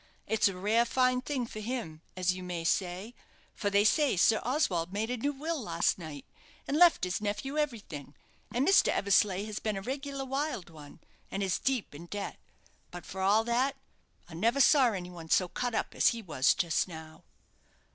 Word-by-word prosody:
It's 220 -1 +2
a 195 -2 -3
rare 215 +5 +3
fine 255 +1 +2
thing 260 -2 -2
for 215 - -8
him, 215 -9 -5 0.2
as 185 0 +2
you 185 - -7
may 175 -2 -4
say; 185 +6 -1 0.4
for 205 - -2
they 200 0 +4
say 275 - +3
Sir 220 +5 +4
Oswald 195 - 0
made 215 +4 -2
a 250 - -1
new 285 +5 -1
will 305 +2 -3
last 170 -3 0
night, 155 -5 -8 0.4
and 280 - -1
left 345 - +5
his 180 +2 -1
nephew 215 +7 -3
everything; 210 - -4 0.4
and 250 +4 0
Mr. 390 - +6
Eversleigh 200 -1 +2
has 215 -1 -5
been 215 -2 -2
a - - -4
regular 275 +2 -4
wild 270 - -3
one, 150 -3 -13 0.3
and 195 - -3
is 190 -1 0
deep 260 - -1
in 165 +4 -10
debt. 205 +2 -5 0.5
But, 175 0 -9
for 190 - -6
all 205 +4 +4
that, 250 +4 +1 0.5
I 175 - -13
never 230 +11 +1
saw 275 -1 +6
any 180 -3 -5
one 165 -2 -10
so 185 - +3
cut 245 +5 -3
up - - -2
as - - +3
he 230 -1 +1
was 150 -7 +2
just 175 -3 +1
now." 160 -2 -11
210 Hz, 195 wpm, -30 LUFS, 180-255 Hz, 0.5 s, Mr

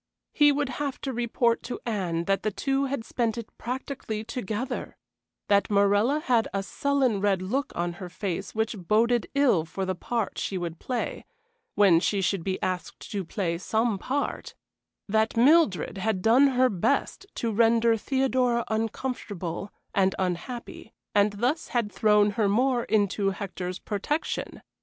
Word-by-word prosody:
He 295 -1 +6
would 285 -1 0
have 280 -2 -2
to 270 - -3
report 235 0 +1
to 245 - -6
Anne 180 -7 -1
that 195 +1 +1
the 215 - 0
two 270 +6 0
had 270 -4 -3
spent 230 -2 -1
it 230 -2 -8
practically 250 -3 -4
together; 235 0 -4 0.5
that 200 -1 +3
Morella 205 +8 +3
had 240 -6 +2
a 195 - 0
sullen 260 -2 0
red 195 -2 +1
look 260 +9 -1
on 175 0 -1
her 180 - -5
face 190 +2 -4
which 220 +1 0
boded 225 +6 +2
ill 255 - +4
for 190 +4 -4
the 185 - -1
part 225 +4 -3
she 195 - -2
would 170 -2 -5
play, 250 -2 -3 0.5
when 195 -5 +6
she 200 +3 0
should 190 -1 0
be 190 +1 -2
asked 185 -1 -4
to 200 -2 -2
play 170 -1 -2
some 220 +2 0
part; 280 +6 -3 0.5
that 220 +2 +1
Mildred 235 - +4
had 190 -2 -1
done 250 +5 +6
her 255 -1 +3
best 255 - -1
to 230 - -1
render 230 +1 +4
Theodora 250 0 +1
uncomfortable 215 -5 -3 0.2
and 190 -1 +2
unhappy, 190 +6 -4 0.2
and 205 0 +3
thus 250 +10 -1
had 235 -4 -1
thrown 210 -1 +4
her 210 -2 +1
more 245 +3 +2
into 200 -1 +1
Hector's 185 -2 -5
protection. 225 +12 -3
220 Hz, 155 wpm, -27 LUFS, 195-250 Hz, 0.5 s, He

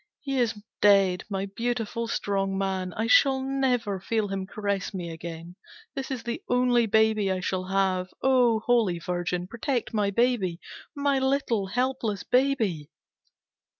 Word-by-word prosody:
He 275 -2 -2
is 225 -3 0 0.2
dead, 195 -3 +4
my 195 -1 -2
beautiful, 230 +2 -3
strong 195 -3 -1
man! 190 -1 -2
I 220 - -2
shall 265 +3 +5
never 255 -6 0
feel 215 +1 -1
him 195 -1 -3
caress 200 -1 -3
me 175 -2 -4
again. 165 +2 -8 0.4
This 270 -1 -5
is 260 -4 -4
the 235 0 -4
only 245 -1 +3
baby 220 -2 +3
I 185 - -1
shall 185 0 -2
have. 190 -1 0 0.2
Oh, 245 -4 +4
Holy 225 -7 +2
Virgin, 175 +1 -2
protect 235 +4 -3
my 205 -2 +1
baby! 200 -6 +1 0.4
My 280 -1 +1
little, 265 -6 0
helpless 245 -3 -1
baby! 235 - +1
215 Hz, 145 wpm, -26 LUFS, 190-245 Hz, 0.4 s, shall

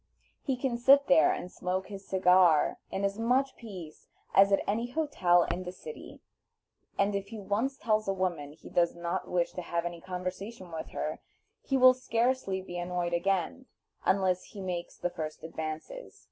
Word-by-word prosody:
He 265 -3 -1
can 245 -2 -1
sit 275 +3 +6
there 160 -4 +5
and 180 - -4
smoke 185 +1 -2
his 200 -1 -9
cigar 180 -4 +4
in 195 - -3
as 200 +2 -2
much 255 +4 +2
peace 185 -9 -10 0.3
as 195 +1 +6
at 195 - +3
any 230 +4 0
hotel 190 - +3
in 180 +2 -3
the 180 - -5
city; 460 - -10 0.8
and 200 +1 +2
if 200 0 -2
he 220 - -8
once 210 +7 -1
tells 215 -2 0
a - - +2
woman 175 -7 -2
he 155 - -15
does 170 -1 +2
not 170 0 -3
wish 175 -1 +1
to 180 - -4
have 170 0 -2
any 170 -1 -5
conversation 185 +2 -6
with 160 -1 -5
her, 155 - -4 0.4
he 270 - 0
will 255 0 +8
scarcely 235 -5 0
be 175 -1 -6
annoyed 175 0 -2
again, 195 +8 0 0.4
unless 185 -2 +2
he 205 - -11
makes 180 -2 -4
the 180 - -2
first 155 -2 -6
advances. 160 - -6
190 Hz, 175 wpm, -30 LUFS, 175-225 Hz, 0.8 s, will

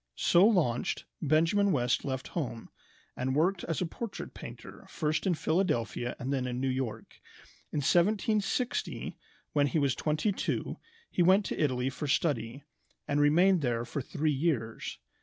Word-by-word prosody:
So 175 - +5
launched, 155 - +1 0.2
Benjamin 165 +7 +3
West 125 -5 +1
left 130 -1 -4
home, 125 -9 -4 0.4
and 130 +1 -1
worked 175 +4 +2
as 165 +1 -2
a - - +1
portrait 220 +5 -6
painter - - -10
first 155 +4 -1
in 180 - +3
Philadelphia 150 - 0
and 130 +3 -3
then 130 -2 -1
in 125 0 -3
New 135 0 0
York. 130 -4 -5 0.5
In 145 - -1
1760, 210 - +1 0.4
when 145 -1 +3
he 160 - 0
was 140 -4 +2
twenty 155 - 0
two, 195 - -2 0.3
he - - +1
went 190 +4 +5
to - - -3
Italy 130 -2 0
for 140 +3 -5
study, 135 -3 0 0.4
and 145 0 +1
remained 175 +5 +5
there 120 -3 0
for 130 +4 -4
three 150 +4 -1
years. 135 -7 -1
150 Hz, 155 wpm, -30 LUFS, 130-175 Hz, 0.5 s, So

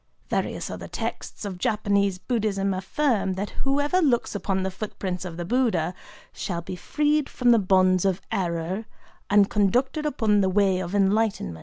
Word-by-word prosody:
Various - - -2
other - - -7
texts - - -5
of 190 -3 -5
Japanese 200 -2 +1
Buddhism 200 -3 -1
affirm 195 +1 0
that 200 +2 -4
whoever 285 +6 +1
looks 255 -7 +2
upon 195 -2 -1
the 190 - -2
footprints 185 -2 -4
of 170 -2 -6
the 175 - -4
Buddha 205 -7 +1 0.4
"shall 170 -3 -4
be 185 +1 -6
freed 295 +8 0
from 245 -1 +2
the 230 - +6
bonds 185 -2 +3
of 190 -1 +1
error, 175 +3 -2 0.4
and 205 -1 +5
conducted 250 - +1
upon 215 -7 +2
the 190 - +2
Way 190 -1 +2
of 185 +1 -4
Enlightenment." 200 - +1
200 Hz, 160 wpm, -25 LUFS, 185-230 Hz, 0.4 s, the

